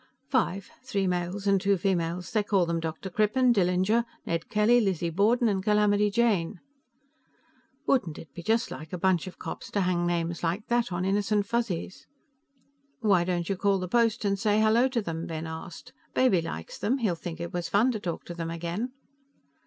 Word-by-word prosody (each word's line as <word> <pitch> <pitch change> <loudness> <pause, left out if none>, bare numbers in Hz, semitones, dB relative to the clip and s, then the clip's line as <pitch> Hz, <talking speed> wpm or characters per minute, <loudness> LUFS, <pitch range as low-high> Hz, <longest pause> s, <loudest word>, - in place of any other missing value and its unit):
"Five, 200 -7 0
three 200 -7 -1
males 180 +2 -2
and 195 -1 +3
two 200 0 +2
females. 175 -2 -1
They 215 - +2
call 200 -3 +2
them 170 0 -1
Dr. 165 +4 -5
Crippen, 240 +6 +3
Dillinger, 190 +3 +2 0.2
Ned 165 -1 -2
Kelly, 220 +3 +4
Lizzie 180 -5 0
Borden 225 +7 +3
and 195 -3 +1
Calamity 210 0 +3
Jane." 205 -5 +1 1.3
Wouldn't 190 - +1
it 150 -4 -12
be 170 - -7
just 225 +6 +1
like 155 0 -8
a 180 - -3
bunch 185 -1 +1
of 185 - -9
cops - - -7
to 200 - 0
hang 175 -1 +1
names 170 -1 -1
like 175 +5 -1
that 240 -3 +1
on 175 +1 -1
innocent 205 +1 +1
Fuzzies? 205 -6 -3 0.9
"Why 195 -6 +4
don't 175 -1 -1
you 195 - 0
call 200 +1 +2
the 185 -1 -3
post 230 +1 +2
and 200 -1 +1
say 210 +1 +2
hello 220 +4 +4
to 245 -4 -1
them?" 165 -2 -4
Ben 160 0 -4
asked. 165 +9 -8 0.2
"Baby 240 -10 +4
likes 80 - -7
them; 240 +6 +1
he'd 200 -10 -1
think 165 -1 -6
it 170 0 -5
was 175 -1 -3
fun 225 +6 +3
to 220 - -3
talk 175 -4 -5
to 175 - -6
them 165 -1 -4
again." 170 +9 -4
195 Hz, 190 wpm, -27 LUFS, 170-215 Hz, 1.3 s, Kelly